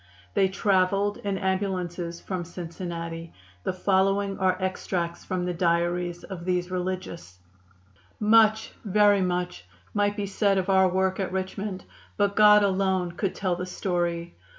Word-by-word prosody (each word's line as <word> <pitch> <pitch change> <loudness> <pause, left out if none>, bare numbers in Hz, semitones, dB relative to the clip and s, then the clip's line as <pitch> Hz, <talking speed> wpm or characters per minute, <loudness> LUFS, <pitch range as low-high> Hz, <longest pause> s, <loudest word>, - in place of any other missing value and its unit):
They 195 - +3
traveled 195 +1 +1
in 200 -1 -3
ambulances 185 -3 -2
from 185 -2 -4
Cincinnati. 170 -1 -6 0.3
The - - 0
following 195 +1 +1
are 185 -1 +2
extracts 180 -2 -2
from 185 -1 -2
the 180 - -1
diaries 175 0 0
of 185 -3 -7
these 180 0 -1
religious: 180 - -4 0.8
"Much, 220 0 +4
very 205 -1 +4
much, 180 - -2 0.3
might 205 0 +1
be 205 - -1
said 200 0 +1
of 190 +1 -1
our 190 0 +5
work 190 +1 0
at 190 -2 -2
Richmond, 190 0 -4 0.3
but 200 -1 +1
God 210 -1 +7
alone 190 -2 +1
could 185 +2 -2
tell 185 -3 0
the 180 +1 -5
story. 175 -2 -2
185 Hz, 140 wpm, -26 LUFS, 175-195 Hz, 0.8 s, God